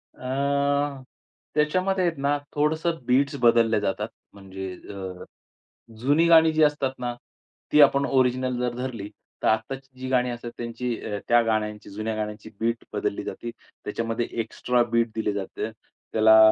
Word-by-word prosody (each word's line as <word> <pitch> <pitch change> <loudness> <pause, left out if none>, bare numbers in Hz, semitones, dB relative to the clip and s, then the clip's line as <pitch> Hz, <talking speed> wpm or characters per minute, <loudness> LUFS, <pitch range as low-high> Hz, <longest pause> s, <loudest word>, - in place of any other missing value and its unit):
अ, 140 +1 0 0.5
त्याच्यामध्ये 185 +5 +2
आहेत 165 -4 0
ना, 145 +1 +2 0.2
थोडंसं 160 +3 +1
बीट्स 140 +3 +2
बदलल्या 115 -2 +5
जातात. 105 +1 -1 0.3
म्हणजे 95 -1 -7
अ, 95 -1 -8 0.8
जुनी 145 +7 +3
गाणी 160 -1 +7
जी 155 0 +4
असतात 145 -3 +2
ना, 120 -1 -2 0.6
ती 150 - +7
आपण 140 0 +5
ओरिजिनल 130 -1 +1
जर 125 -1 -1
धरली, 120 -5 -4 0.3
तर - - +2
आत्ताची 130 +4 -1
जी 130 - -4
गाणी 125 -1 +2
असतात. 120 0 -6
त्यांची 120 +1 -3 0.2
अ, 105 - -1
त्या 120 0 +6
गाण्यांची 105 -1 -1
जुन्या 110 +2 -3
गाण्यांची 105 0 -5
बीट 115 +1 -1
बदलली - - -2
जाते. 120 - -5 0.3
त्याच्यामध्ये 115 +2 -2
एक्स्ट्रा 120 +2 +1
बीट 115 0 +2
दिले 110 -2 0
जाते. 100 -1 -4 0.4
त्याला 110 0 +7
125 Hz, 145 wpm, -25 LUFS, 110-140 Hz, 0.8 s, गाणी